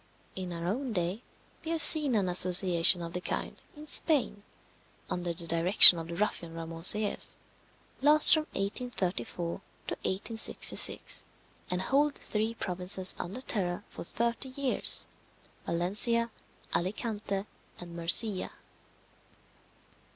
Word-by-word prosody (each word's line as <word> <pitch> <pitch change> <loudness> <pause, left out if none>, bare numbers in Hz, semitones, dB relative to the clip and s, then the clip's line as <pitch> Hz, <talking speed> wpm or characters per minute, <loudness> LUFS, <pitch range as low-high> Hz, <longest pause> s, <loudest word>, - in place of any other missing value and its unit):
In 185 -1 -7
our 170 0 -8
own 240 +7 -5
day 180 +3 -4 0.4
we 320 - -8
have 330 -1 -3
seen 295 -6 +6
an 200 -3 -1
association 180 -1 +4
of 170 0 -9
the 180 - -6
kind - - -7
in 300 +1 -13
Spain, 285 -8 +3 0.7
under 175 -1 -4
the 170 0 -5
direction 170 +1 +6
of 165 - -9
the 170 - -8
ruffian 170 -4 -5
Ramon 165 0 -10
Selles, 210 +3 +2 0.6
last 300 +2 +7
from 310 -1 0
1834 190 - -5 0.3
to - - -5
1866, 220 +4 +1 0.5
and 180 +1 -3
hold 285 +4 -1
three 220 +2 -5
provinces 185 -1 0
under 195 +9 -7
terror 180 -8 -4
for - - -11
thirty 235 +7 -3
years 265 0 0 0.6
Valencia, 210 +7 -3 0.4
Alicante, 200 +1 -5 0.3
and 175 -1 -11
Murcia. 185 +4 0
190 Hz, 120 wpm, -27 LUFS, 175-235 Hz, 0.7 s, last